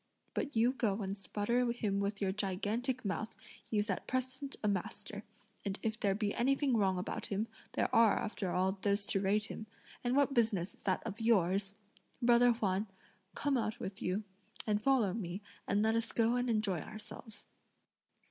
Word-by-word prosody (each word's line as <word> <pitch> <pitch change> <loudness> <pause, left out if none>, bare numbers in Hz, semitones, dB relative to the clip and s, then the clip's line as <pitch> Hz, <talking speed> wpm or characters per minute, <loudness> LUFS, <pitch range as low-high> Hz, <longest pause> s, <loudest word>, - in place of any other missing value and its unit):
But 290 - -2
you 235 +3 +4
go 215 -5 0
and 195 +1 -2
sputter 235 +5 0
him 210 -4 -1
with 200 +1 -1
your 190 - +2
gigantic 210 +6 -1
mouth; 205 +2 -2 0.3
he's 210 -1 0
at 190 - -2
present 260 +2 -2
a - - +2
master, 205 +1 -2 0.4
and 200 -1 -2
if 220 0 -1
there 195 -1 +2
be 210 -1 0
anything 270 +1 +2
wrong 190 -4 +3
about 180 - -3
him, 210 +3 -1 0.3
there - - +2
are, 230 -2 +7
after 210 -3 -2
all, 190 +2 +1
those 200 0 +2
to 195 - +1
rate 205 +2 +2
him; 215 +1 -7 0.4
and 245 +1 +1
what 280 -1 +4
business 215 -7 +2
is - - -21
that 190 -2 +1
of 225 0 -5
yours? 195 -3 +2 0.4
Brother 240 0 +6
Huan, 210 -3 0 0.5
come 285 -2 +1
out 225 0 -1
with 200 -4 -5
you, 185 +4 0 0.4
and 210 -1 +1
follow 240 -7 +3
me 190 -2 -4 0.2
and 205 +1 +2
let 220 0 +3
us 230 0 0
go 230 +1 +3
and 245 0 0
enjoy 215 -6 +1
ourselves." 215 +3 -9
215 Hz, 175 wpm, -34 LUFS, 195-235 Hz, 0.5 s, are